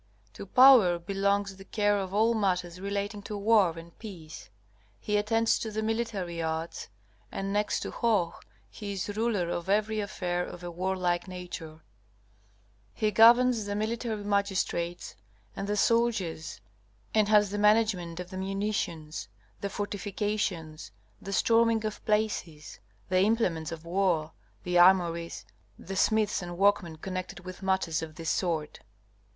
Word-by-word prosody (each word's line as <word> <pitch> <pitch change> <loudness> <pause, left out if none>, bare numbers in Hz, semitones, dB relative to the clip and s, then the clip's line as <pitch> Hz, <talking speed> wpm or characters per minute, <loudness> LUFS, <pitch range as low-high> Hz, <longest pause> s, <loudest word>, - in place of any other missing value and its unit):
To - - -9
Power 245 -7 +7
belongs 195 +2 -1
the 195 - -11
care 205 +1 +1
of 190 -1 -4
all 220 +3 +3
matters 180 -4 -1
relating 200 +1 -3
to 205 +1 -6
war 200 -5 +3
and 165 0 -11
peace. 165 - -10 0.5
He 210 - -2
attends 225 +2 +2
to 225 - -4
the 220 0 -3
military 215 -7 -2
arts, 160 +1 -4 0.4
and, 195 0 -3
next 210 0 0
to - - -4
Hoh, 205 -8 +1 0.4
he 205 -1 -6
is 200 +1 -4
ruler 210 -6 0
in 175 +2 -5
every 215 +2 +1
affair 180 -4 -2
of 175 0 -9
a 175 - -5
warlike 180 0 -1
nature. 170 -4 -8 1.1
He 215 -1 +1
governs 235 +1 +6
the 205 - -2
military 220 0 -2
magistrates 195 -4 -1 0.4
and 200 - -4
the 210 0 -1
soldiers, 205 - 0 0.5
and 215 -1 +3
has 210 -2 +4
the 205 - -2
management 210 -5 +2
of 180 +1 -7
the 185 - -6
munitions, 190 - -3 0.3
the 200 - -3
fortifications, 200 -5 -3 0.3
the 195 - -7
storming 225 +2 +3
of 215 - -5
places, 210 -8 -2 0.3
the 185 0 +3
implements 185 -6 +1
of 165 0 -8
war, 170 -3 0 0.3
the 180 0 +2
armories, 170 - +3 0.3
the 195 - -7
smiths 215 +1 +2
and 175 -1 -7
workmen 195 -4 +2
connected 185 +2 -6
with 185 +1 -9
matters 190 -4 0
of 155 -1 -7
this 165 0 -2
sort. 160 -5 -2
195 Hz, 145 wpm, -28 LUFS, 175-210 Hz, 1.1 s, Power